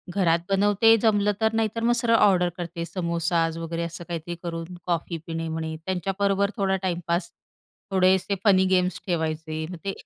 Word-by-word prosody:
घरात 170 -4 +3
बनवते 205 +3 +4
जमलं 210 -2 +3
तर, 220 0 +2
नाही 225 -1 +1
तर 230 - -2
मग 240 +1 +4
सरळ 230 -1 +3
ऑर्डर 185 -5 +4
करते 170 -1 -5
समोसाज 170 -2 -1
वगैरे 165 0 -3
असं 170 +1 -6
काहीतरी 170 +1 -4
करून 165 +1 -5
कॉफी 170 -1 -2
पिणे 165 0 -3
म्हणे 160 0 -3
त्यांच्याबरोबर 195 +2 0
थोडा 195 -2 +1
टाईमपास, 170 -1 -1 0.6
थोडेसे 190 +1 +3
फनी 190 -2 +5
गेम्स 185 -1 +1
ठेवायचे, 160 -2 -2
मग 180 - -6
ते 195 - -1
180 Hz, 160 wpm, -25 LUFS, 165-195 Hz, 0.6 s, फनी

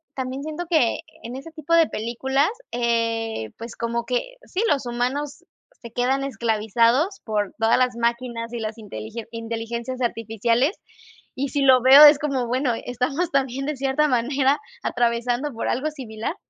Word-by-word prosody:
también 265 +1 -4
siento 310 +3 -5
que 310 -9 +2 0.2
en 245 +3 -6
ese 300 +5 -9
tipo 315 +1 -4
de 330 -1 +5
películas, 265 - 0 0.2
eh, 230 - -1
pues, 230 +1 -9
como 235 0 -2
que 255 - -2
sí, 380 - -3
los 275 -3 +1
humanos 270 +7 -3 0.4
se 235 - -10
quedan 265 +3 +1
esclavizados 235 - +1
por 210 -3 -2
todas 225 0 +3
las 250 -1 +1
máquinas 235 0 -2
y 240 - -4
las 220 0 -4
inteligen 210 - -7
inteligencias 230 +2 -5
artificiales, 230 - 0 0.6
y 270 +1 -2
si 285 - -1
lo 260 -2 +6
veo 270 +3 +9
es 295 -1 +9
como, 275 -5 -1
bueno, 250 +1 0
estamos 275 +8 -1
también 270 -1 0
de 300 -1 -3
cierta 275 +3 +1
manera 265 +3 +2 0.2
atravesando 240 +3 0
por 230 - -3
algo 280 +5 0
similar. 250 -1 -5
245 Hz, 155 wpm, -23 LUFS, 230-275 Hz, 0.6 s, veo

